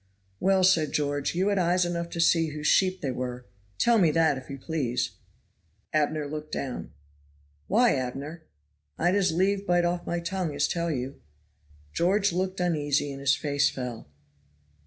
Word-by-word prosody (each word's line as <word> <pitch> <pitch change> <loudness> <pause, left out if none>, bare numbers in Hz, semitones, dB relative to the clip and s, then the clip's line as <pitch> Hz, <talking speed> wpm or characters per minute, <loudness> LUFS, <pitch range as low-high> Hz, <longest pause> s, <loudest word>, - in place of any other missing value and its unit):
Well," 190 0 +3
said 165 -5 +3
George, 145 +1 -1
"you 190 +3 +2
had 200 -1 +1
eyes 180 +1 +2
enough 170 -1 -3
to 170 - -6
see 165 -1 +4
whose 150 0 -6
sheep 185 +3 +3
they 135 - -1
were. 125 0 -5 0.3
Tell 235 - +4
me 175 -5 +5
that, 160 -1 +3
if 130 -1 -9
you 140 - -6
please?" 135 -4 -2 0.8
Abner 155 0 +1
looked 150 +1 -6
down. 130 -3 -4 0.8
"Why, 235 +5 +4
Abner?" 140 +5 -4 0.6
"I'd 175 +2 +2
as 195 -3 +2
lieve 195 +4 +1
bite 175 0 +3
off 175 0 -2
my 175 - -1
tongue 170 -3 -3
as 145 - +2
tell 170 0 -1
you." 135 -2 -4 0.7
George 195 +3 +2
looked 185 +1 -2
uneasy 145 -5 0
and 135 - -7
his 135 -1 +3
face 145 -1 +1
fell. 125 - -6
165 Hz, 165 wpm, -27 LUFS, 145-180 Hz, 0.8 s, me